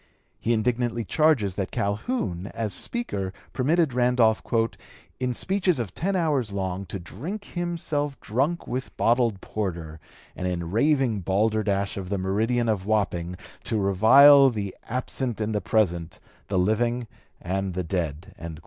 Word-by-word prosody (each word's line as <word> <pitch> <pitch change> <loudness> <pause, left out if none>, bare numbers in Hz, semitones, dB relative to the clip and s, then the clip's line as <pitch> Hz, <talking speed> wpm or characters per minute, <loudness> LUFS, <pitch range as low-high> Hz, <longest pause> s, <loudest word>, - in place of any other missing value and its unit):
He 115 - -1
indignantly 120 +1 0
charges 145 - +2
that 95 0 -3
Calhoun, 100 - -2
as 110 -4 0
Speaker, 100 - -2 0.2
permitted 155 +2 +2
Randolph 120 -3 +3 0.8
"in 125 -1 0
speeches 190 - +1
of 110 -7 -4
ten 195 +4 -1
hours 145 - +1
long 95 -1 -3
to 100 - -5
drink 145 - -6
himself 160 -5 -3
drunk 140 +10 -1
with 130 +1 -5
bottled 115 -4 +2
porter, 85 -7 -4 0.4
and 90 - -3
in 85 -2 -3
raving 130 -1 +2
balderdash 100 +1 0
of 95 -2 -5
the 100 - -1
meridian 110 +6 0
of 100 -3 -1
Wapping 90 -5 0 0.3
to 110 - 0
revile 135 +9 +7
the 105 -5 -4
absent 125 -1 -3
and 110 0 -1
the 105 - 0
present, 85 -5 0 0.3
the 100 - -1
living 120 +6 +1 0.3
and 95 0 -2
the 90 - -1
dead." 85 -2 -3
110 Hz, 140 wpm, -25 LUFS, 95-130 Hz, 0.8 s, revile